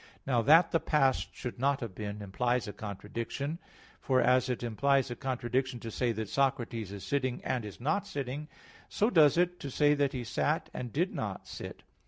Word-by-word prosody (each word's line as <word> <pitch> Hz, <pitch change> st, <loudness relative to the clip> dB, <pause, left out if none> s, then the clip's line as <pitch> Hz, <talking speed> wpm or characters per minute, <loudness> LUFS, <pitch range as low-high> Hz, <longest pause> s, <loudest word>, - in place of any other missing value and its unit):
Now 125 Hz, -3 st, +2 dB
that 165 Hz, +7 st, +6 dB
the 165 Hz, -, +3 dB
past 135 Hz, -5 st, +2 dB
should 125 Hz, -1 st, -6 dB
not 140 Hz, +1 st, +2 dB
have 115 Hz, -5 st, -5 dB
been 105 Hz, +1 st, -5 dB
implies 120 Hz, +3 st, 0 dB
a 105 Hz, -, -5 dB
contradiction. 115 Hz, -, -5 dB, 0.4 s
For 130 Hz, -1 st, +2 dB
as 130 Hz, 0 st, +3 dB
it 125 Hz, -1 st, -2 dB
implies 135 Hz, +3 st, +2 dB
a -, -, -3 dB
contradiction 130 Hz, 0 st, -1 dB
to 115 Hz, -, -6 dB
say 120 Hz, +2 st, 0 dB
that 110 Hz, 0 st, -4 dB
Socrates 120 Hz, -5 st, 0 dB
is 100 Hz, -1 st, -7 dB
sitting, 130 Hz, -3 st, -1 dB
and 125 Hz, -3 st, -1 dB
is 105 Hz, -2 st, -8 dB
not 155 Hz, +11 st, 0 dB
sitting, 140 Hz, 0 st, -4 dB, 0.4 s
so 215 Hz, +4 st, +1 dB
does 155 Hz, -, +6 dB
it 180 Hz, 0 st, +2 dB
to 140 Hz, -, -5 dB
say 145 Hz, +2 st, +4 dB
that 140 Hz, -2 st, +1 dB
he 125 Hz, -2 st, -3 dB
sat, 135 Hz, +7 st, -1 dB
and 125 Hz, -2 st, -5 dB
did 175 Hz, -, 0 dB
not 100 Hz, -3 st, -4 dB
sit. -, -, -8 dB
130 Hz, 195 wpm, -31 LUFS, 115-140 Hz, 0.4 s, that